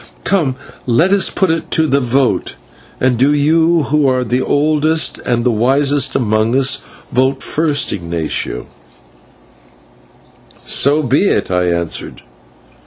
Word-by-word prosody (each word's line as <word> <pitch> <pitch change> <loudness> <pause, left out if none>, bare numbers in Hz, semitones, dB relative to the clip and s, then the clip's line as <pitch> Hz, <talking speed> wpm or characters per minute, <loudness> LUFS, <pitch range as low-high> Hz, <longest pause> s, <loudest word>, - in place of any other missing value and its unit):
Come, 155 -10 0 0.3
let 160 +11 +2
us 200 - +3
put 190 -4 0
it 165 0 -3
to 160 - +1
the 140 -2 +1
vote, 130 - 0 0.4
and 125 -2 +1
do 140 +3 +3
you 160 +3 +2
who 150 0 +1
are 130 -1 +1
the 125 +2 -1
oldest 155 +3 +1
and 120 -1 -1
the 125 - +2
wisest 135 +4 +1
among 110 +1 +1
us, 130 -1 +1 0.3
vote 130 +2 0
first, 155 -2 0
Ignatio." 85 -4 -4 2.0
"So 145 +3 +2
be 140 - +2
it," - - -1
I 90 0 +1
answered. 85 -2 -3
135 Hz, 130 wpm, -15 LUFS, 120-155 Hz, 2.0 s, us